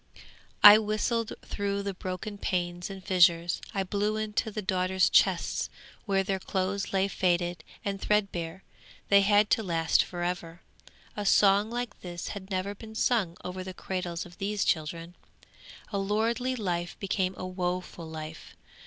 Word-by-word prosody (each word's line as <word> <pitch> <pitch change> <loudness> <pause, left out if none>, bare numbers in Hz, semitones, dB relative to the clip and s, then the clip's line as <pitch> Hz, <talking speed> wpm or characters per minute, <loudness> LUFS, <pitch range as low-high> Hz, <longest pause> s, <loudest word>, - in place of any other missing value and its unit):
'I 210 +1 +12
whistled 220 +2 -1
through 200 -1 -2
the 200 0 -3
broken 190 +3 -6
panes 175 -1 -2
and 195 -1 -8
fissures; 175 -2 +4
I 195 - -1
blew 205 +3 -1
into 215 0 -1
the 215 0 -5
daughters' 185 -1 +2
chests - - +2 0.4
where 195 -1 +2
their 195 0 -1
clothes 190 +1 -2
lay 195 0 +2
faded 175 -3 0 0.2
and 195 -1 -2
threadbare; 190 -4 -1 0.5
they 200 0 +7
had 205 +1 +4
to - - +4
last 165 -5 +2
for 175 -1 -4
ever. 175 -1 -4 0.5
A 210 - -3
song 200 +1 +4
like 240 -1 -4
this 175 -2 -6
had 195 -2 -7
never 190 +1 -2
been 220 +2 -11
sung 215 -8 +1
over 185 +1 -4
the 185 0 -8
cradles 180 -3 -4
of 175 +1 -15
these 205 0 -1
children. 165 +2 -1 0.8
A 200 - 0
lordly 230 +6 0
life 175 -6 -3
became 190 -1 -1
a - - -5
woeful 180 -2 -4
life! 155 0 -8
190 Hz, 155 wpm, -28 LUFS, 175-205 Hz, 0.8 s, I